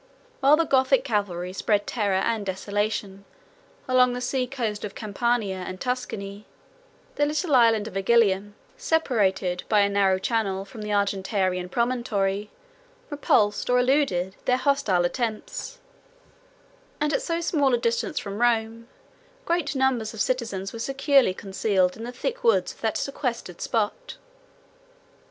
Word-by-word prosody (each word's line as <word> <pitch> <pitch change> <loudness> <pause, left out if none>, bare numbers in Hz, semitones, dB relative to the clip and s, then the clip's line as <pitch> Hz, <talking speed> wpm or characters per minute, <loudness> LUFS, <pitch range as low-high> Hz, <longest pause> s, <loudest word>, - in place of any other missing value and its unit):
While 285 +2 +5
the 330 - +2
Gothic 265 -2 +3
cavalry 195 -7 -2
spread 205 +1 0
terror 205 -5 0
and 225 -2 0
desolation 200 +1 -3 0.6
along 250 -1 +4
the 245 - -3
sea 250 0 -1
coast 230 -6 -3
of 210 - -6
Campania 215 -2 -1
and 185 0 -6
Tuscany, 210 -5 -4 0.7
the 290 - +3
little 305 +1 -1
island 225 -4 +4
of 220 - -9
Igilium, 205 -1 +2 0.2
separated 200 - 0
by 210 -2 +4
a 200 - +3
narrow 195 -2 +3
channel 195 -2 -1
from 215 +2 -10
the 210 - -5
Argentarian 195 -2 0
promontory, 210 -4 -1 0.6
repulsed, 215 -8 +1
or 250 - +4
eluded, 250 -8 +1
their 250 - +3
hostile 255 -10 +1
attempts; 235 - -3 1.2
and 300 0 0
at - - +1
so 335 -8 -2
small 295 -5 +1
a - - +1
distance 235 0 -1
from 200 +2 -4
Rome, 230 -1 +1 0.6
great 340 - 0
numbers 255 -5 0
of - - -9
citizens 210 -7 -2
were 230 - -7
securely 270 -4 +2
concealed 190 -2 0
in 225 - -7
the 245 - -5
thick 485 - -4
woods 465 - +2
of - - -23
that - - 0
sequestered 245 - -4
spot. 215 -3 -2
225 Hz, 140 wpm, -25 LUFS, 200-255 Hz, 1.2 s, While